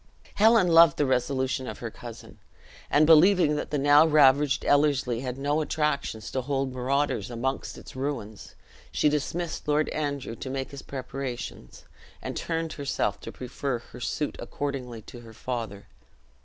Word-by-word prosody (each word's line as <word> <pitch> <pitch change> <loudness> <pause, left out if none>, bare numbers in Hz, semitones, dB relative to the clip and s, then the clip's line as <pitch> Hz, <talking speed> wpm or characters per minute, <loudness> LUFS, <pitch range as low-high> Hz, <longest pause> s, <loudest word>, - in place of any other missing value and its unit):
Helen 220 -2 +5
loved 165 -3 +6
the 145 - +2
resolution 130 0 0
of - - -6
her 115 -2 -6
cousin; 120 0 -11 0.5
and 150 +1 +4
believing 165 0 +6
that - - -3
the 150 - -1
now 145 +2 +6
ravaged 145 -2 +4
Ellerslie 140 -5 +2
had 125 0 -4
no 145 +3 0
attractions 150 -8 -2
to 130 - -1
hold 135 0 -2
marauders 135 +3 -1
amongst 130 +3 -3
its - - -12
ruins, 130 -6 -5 0.4
she 150 - +2
dismissed 155 +3 -3
Lord 150 +1 +2
Andrew 140 -6 -3
to 130 - -7
make 135 +1 -4
his 140 -1 -8
preparations, 125 - -7 0.3
and - - -6
turned 165 -1 -2
herself 140 -2 -2
to - - -7
prefer 130 +1 -4
her 120 - -13
suit 145 +4 -2
accordingly 125 -6 -5
to 120 - -11
her 115 -1 -13
father. 110 -4 -5
140 Hz, 155 wpm, -27 LUFS, 125-150 Hz, 0.5 s, loved